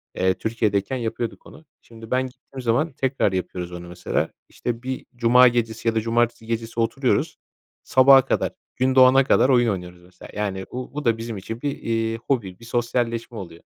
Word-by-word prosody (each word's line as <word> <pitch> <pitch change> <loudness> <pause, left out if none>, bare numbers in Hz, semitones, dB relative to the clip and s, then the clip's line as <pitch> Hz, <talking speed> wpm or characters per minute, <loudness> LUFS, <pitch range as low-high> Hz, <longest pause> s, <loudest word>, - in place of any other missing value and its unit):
Eee, 95 0 +2
Türkiye'deyken 110 +2 -1
yapıyorduk 115 0 -4
onu. 160 - -15 0.2
Şimdi 115 0 -13
ben 130 +1 +1
gittiğim 130 +1 -11
zaman 120 +8 +1
tekrar 135 -5 0
yapıyoruz 90 -1 -4
onu 85 0 -8
mesela. 90 0 -2 0.2
İşte, 120 0 -4
bir 130 0 -4
cuma 125 +1 +6
gecesi 115 -1 -1
ya 115 - +2
da 110 - +2
cumartesi 120 0 0
gecesi 115 0 -4
oturuyoruz, 115 -1 0 0.5
sabaha 135 0 +6
kadar, - - 0 0.2
gün 130 +1 +1
doğana 130 +1 +7
kadar 130 0 +3
oyun 120 -2 +4
oynuyoruz, 90 -3 -5
mesela. 90 0 -15
Yani, 100 -2 -3
bu 125 +1 -6
bu 150 +1 -5
da 115 -1 +3
bizim 115 -2 -5
için 115 +4 -7
bir, 145 - -1
iii, 115 0 -1
hobi, 115 -6 -2
bir 115 - -13
sosyalleşme 120 -1 -2
oluyor. 85 -4 -9
115 Hz, 180 wpm, -23 LUFS, 105-125 Hz, 0.5 s, doğana